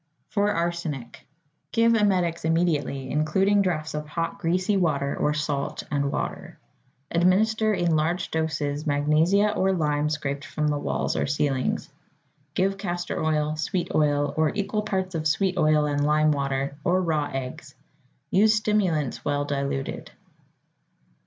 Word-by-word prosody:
=For 205 Hz, 0 st, +1 dB
Arsenic.= 170 Hz, -, -3 dB, 0.4 s
Give 230 Hz, 0 st, +4 dB
emetics 185 Hz, -6 st, +1 dB
immediately, 160 Hz, -5 st, 0 dB
including 190 Hz, +7 st, +2 dB
draughts 160 Hz, -5 st, -1 dB
of 150 Hz, 0 st, -4 dB
hot, 165 Hz, +4 st, -3 dB
greasy 185 Hz, +3 st, +1 dB
water 145 Hz, -7 st, +1 dB
or 150 Hz, 0 st, 0 dB
salt 150 Hz, -2 st, -2 dB
and 140 Hz, -1 st, 0 dB
water. -, -, -4 dB, 0.5 s
Administer 215 Hz, +6 st, +3 dB
in 170 Hz, -3 st, +1 dB
large 160 Hz, +4 st, 0 dB
doses 150 Hz, -2 st, -2 dB
magnesia 155 Hz, +8 st, +3 dB
or 190 Hz, 0 st, +2 dB
lime 150 Hz, -3 st, 0 dB
scraped 145 Hz, -2 st, -3 dB
from 150 Hz, -1 st, -2 dB
the 145 Hz, -1 st, 0 dB
walls -, -, -1 dB
or -, -, 0 dB
ceilings. 140 Hz, -2 st, 0 dB, 0.7 s
Give 195 Hz, +1 st, +1 dB
castor 175 Hz, -4 st, -3 dB
oil, 155 Hz, -1 st, +1 dB
sweet 180 Hz, +2 st, -2 dB
oil, 145 Hz, -1 st, +2 dB
or 155 Hz, -1 st, +3 dB
equal 205 Hz, +1 st, -1 dB
parts 190 Hz, -3 st, -2 dB
of 160 Hz, -1 st, -1 dB
sweet 185 Hz, +4 st, +1 dB
oil 155 Hz, -2 st, +3 dB
and 145 Hz, -1 st, 0 dB
lime 155 Hz, +1 st, +3 dB
water, 140 Hz, -1 st, -1 dB
or 180 Hz, +2 st, +2 dB
raw 155 Hz, -5 st, 0 dB
eggs. 135 Hz, +2 st, -6 dB, 0.6 s
Use 215 Hz, +3 st, +5 dB
stimulants 180 Hz, -, 0 dB
well 145 Hz, 0 st, 0 dB
diluted. 140 Hz, -1 st, -3 dB
155 Hz, 140 wpm, -25 LUFS, 145-185 Hz, 0.7 s, Use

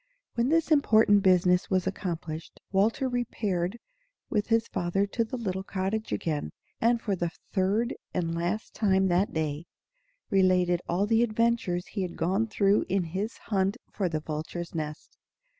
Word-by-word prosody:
When 235 Hz, +2 st, +1 dB
this 330 Hz, +1 st, +2 dB
important 220 Hz, -8 st, +5 dB
business 180 Hz, -1 st, +4 dB
was 185 Hz, -2 st, +1 dB
accomplished, 170 Hz, -4 st, -4 dB
Walter 215 Hz, +7 st, +2 dB
repaired 215 Hz, -6 st, -1 dB, 0.5 s
with 210 Hz, -2 st, +1 dB
his 230 Hz, 0 st, +2 dB
father 175 Hz, +3 st, 0 dB
to 230 Hz, +3 st, -1 dB
the 240 Hz, +3 st, -5 dB
little 190 Hz, -5 st, -2 dB
cottage 195 Hz, +3 st, -3 dB
again, 150 Hz, -, -2 dB, 0.3 s
and 235 Hz, +1 st, +3 dB
for 205 Hz, -4 st, -1 dB
the 175 Hz, -1 st, -1 dB, 0.2 s
third 205 Hz, +5 st, +1 dB, 0.2 s
and 165 Hz, -2 st, -1 dB
last 175 Hz, +6 st, -2 dB
time 190 Hz, -3 st, +2 dB
that 180 Hz, +3 st, +2 dB
day 155 Hz, 0 st, -2 dB, 0.6 s
related 180 Hz, -2 st, +3 dB
all 180 Hz, +4 st, +2 dB
the 225 Hz, +2 st, +3 dB
adventures 230 Hz, -6 st, +1 dB
he 200 Hz, -, -4 dB
had 180 Hz, -2 st, -4 dB
gone 190 Hz, +7 st, +1 dB
through 205 Hz, -2 st, +3 dB
in 190 Hz, 0 st, +1 dB
his 190 Hz, +7 st, -4 dB, 0.2 s
hunt 195 Hz, 0 st, +2 dB
for 190 Hz, -4 st, -1 dB
the 155 Hz, -2 st, -2 dB
vulture's 160 Hz, +3 st, -5 dB
nest. 155 Hz, -2 st, -6 dB
190 Hz, 155 wpm, -28 LUFS, 175-220 Hz, 0.6 s, important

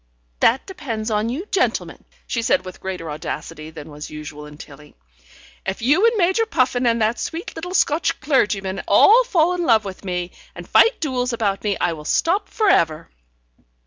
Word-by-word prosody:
"That 245 Hz, +4 st, +3 dB
depends 240 Hz, -, -5 dB
on 215 Hz, +1 st, 0 dB
you 290 Hz, +11 st, -4 dB
gentlemen," 385 Hz, -, -1 dB, 0.2 s
she 235 Hz, -, -2 dB
said 250 Hz, 0 st, +1 dB
with 185 Hz, -, -10 dB
greater 180 Hz, -4 st, -5 dB
audacity 155 Hz, +1 st, -6 dB
than 155 Hz, -1 st, -10 dB
was 150 Hz, +1 st, -8 dB
usual 150 Hz, -1 st, -8 dB
in 150 Hz, 0 st, -13 dB
Tilling. 150 Hz, 0 st, -13 dB, 0.7 s
"If 190 Hz, +4 st, -4 dB
you 310 Hz, -, +4 dB
and 460 Hz, -1 st, +1 dB
Major 380 Hz, +4 st, +2 dB
Puffin 255 Hz, -, +1 dB
and 230 Hz, 0 st, +2 dB
that 220 Hz, +2 st, 0 dB
sweet 330 Hz, +2 st, -5 dB
little 355 Hz, +3 st, -5 dB
Scotch 315 Hz, 0 st, +1 dB
clergyman 200 Hz, -9 st, 0 dB
all 440 Hz, -, +6 dB
fall 360 Hz, -7 st, +2 dB
in 355 Hz, -1 st, -2 dB
love 225 Hz, -8 st, +3 dB
with 190 Hz, 0 st, -8 dB
me, 180 Hz, -2 st, -3 dB, 0.2 s
and -, -, -9 dB
fight 465 Hz, -, +4 dB
duels 255 Hz, -5 st, -1 dB
about 205 Hz, -4 st, -1 dB
me, 205 Hz, -2 st, 0 dB
I 175 Hz, -1 st, +1 dB
will 150 Hz, -1 st, -10 dB
stop 350 Hz, -, +1 dB
for 435 Hz, -, 0 dB
ever. 160 Hz, -, +2 dB
230 Hz, 180 wpm, -21 LUFS, -, 0.7 s, all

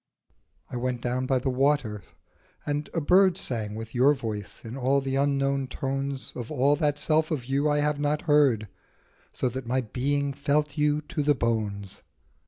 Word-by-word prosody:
I 125 Hz, -, -3 dB
went 125 Hz, 0 st, -2 dB
down 125 Hz, +1 st, -2 dB
by 130 Hz, -, +2 dB
the 130 Hz, +1 st, -1 dB
waters, 130 Hz, -6 st, 0 dB, 0.5 s
and 145 Hz, 0 st, -2 dB
a 165 Hz, -, -1 dB
bird 185 Hz, +3 st, +4 dB
Sang 110 Hz, -, -3 dB
with 115 Hz, +1 st, -7 dB
your 135 Hz, +4 st, +4 dB
voice 110 Hz, -7 st, -6 dB
in 115 Hz, +2 st, -6 dB
all 135 Hz, +1 st, +2 dB
the 135 Hz, -1 st, -2 dB
unknown 140 Hz, -1 st, +1 dB
tones 135 Hz, +1 st, -3 dB
Of 120 Hz, -2 st, -6 dB
all 145 Hz, 0 st, +3 dB
that 145 Hz, -1 st, +1 dB
self 155 Hz, +1 st, +1 dB
of 145 Hz, -7 st, -2 dB
you 140 Hz, +3 st, +1 dB
I 145 Hz, 0 st, +2 dB
have 150 Hz, 0 st, 0 dB
not 145 Hz, +1 st, 0 dB
heard, 140 Hz, -9 st, +3 dB, 0.6 s
So -, -, -1 dB
that 130 Hz, 0 st, -6 dB
my 130 Hz, +2 st, +1 dB
being 140 Hz, +4 st, -1 dB
felt 145 Hz, +2 st, 0 dB
you 150 Hz, -1 st, +2 dB
to 150 Hz, +1 st, -4 dB
the 145 Hz, 0 st, +3 dB
bones. 105 Hz, -5 st, -2 dB
135 Hz, 180 wpm, -27 LUFS, 125-145 Hz, 0.6 s, bird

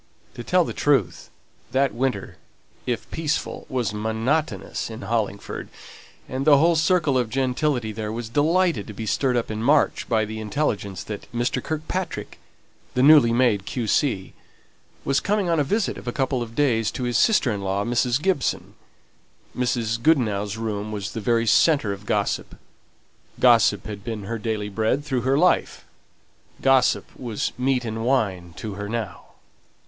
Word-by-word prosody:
To 120 Hz, -, -7 dB
tell 180 Hz, +7 st, +3 dB
the -, -, -5 dB
truth, 135 Hz, -, 0 dB, 0.4 s
that 135 Hz, +1 st, +2 dB
winter, 120 Hz, -5 st, -2 dB, 0.5 s
if 120 Hz, -2 st, -2 dB
peaceful, 155 Hz, -2 st, -3 dB
was 125 Hz, -5 st, -1 dB
monotonous 110 Hz, -, -2 dB
in 110 Hz, +2 st, -8 dB
Hollingford; 110 Hz, -3 st, -3 dB, 0.6 s
and 130 Hz, +1 st, -3 dB
the 145 Hz, -1 st, +6 dB
whole 165 Hz, +4 st, +4 dB
circle 160 Hz, -5 st, +2 dB
of 120 Hz, -3 st, -1 dB
gentility 130 Hz, -1 st, 0 dB
there 105 Hz, 0 st, -4 dB
was 115 Hz, +1 st, -4 dB
delighted 155 Hz, -, +1 dB
to 105 Hz, -, -7 dB
be 110 Hz, -, -5 dB
stirred 125 Hz, +3 st, +1 dB
up 115 Hz, -, -2 dB
in 110 Hz, 0 st, -4 dB
March 145 Hz, +5 st, +2 dB
by 110 Hz, -2 st, +2 dB
the 110 Hz, +1 st, -6 dB
intelligence 105 Hz, -, -2 dB
that 105 Hz, +2 st, -8 dB
Mr. 120 Hz, 0 st, -1 dB
Kirkpatrick, 160 Hz, +4 st, -4 dB, 0.6 s
the 125 Hz, -, +3 dB
newly 145 Hz, -5 st, +7 dB
made 115 Hz, -5 st, +2 dB
Q.C., 115 Hz, -, 0 dB, 0.7 s
was 135 Hz, 0 st, +2 dB
coming 205 Hz, -3 st, 0 dB
on 165 Hz, -2 st, +2 dB
a -, -, +3 dB
visit 200 Hz, +9 st, -1 dB
for 125 Hz, -, -4 dB
a -, -, -1 dB
couple 130 Hz, -2 st, 0 dB
of 115 Hz, -1 st, -6 dB
days 115 Hz, -6 st, +2 dB
to 130 Hz, -, -5 dB
his 120 Hz, -1 st, -1 dB
sister 210 Hz, -, +3 dB
in 100 Hz, -2 st, -3 dB
law, 100 Hz, +1 st, -1 dB
Mrs. 120 Hz, +1 st, +1 dB
Gibson. 180 Hz, -5 st, -1 dB, 0.8 s
Mrs. 115 Hz, -2 st, -1 dB
Goodenough's 110 Hz, -8 st, +1 dB
room 110 Hz, -2 st, -3 dB
was 100 Hz, -2 st, -4 dB
the 110 Hz, -, -5 dB
very 115 Hz, +2 st, +2 dB
centre 115 Hz, -3 st, +3 dB
of 100 Hz, +1 st, -11 dB
gossip; -, -, -1 dB, 0.8 s
gossip -, -, +4 dB
had 105 Hz, -2 st, -7 dB
been 110 Hz, -3 st, -5 dB
her 115 Hz, +3 st, -4 dB
daily 110 Hz, -2 st, -2 dB
bread 110 Hz, +8 st, 0 dB
through 130 Hz, -4 st, -1 dB
her 130 Hz, +3 st, +2 dB
life, 180 Hz, +4 st, +2 dB, 0.7 s
gossip 135 Hz, -2 st, +3 dB
was 120 Hz, -5 st, -3 dB
meat 125 Hz, 0 st, 0 dB
and 110 Hz, 0 st, -3 dB
wine 100 Hz, -9 st, 0 dB
to 110 Hz, -2 st, -5 dB
her 100 Hz, +1 st, -6 dB
now. 110 Hz, -6 st, -4 dB
120 Hz, 160 wpm, -23 LUFS, 110-140 Hz, 0.8 s, newly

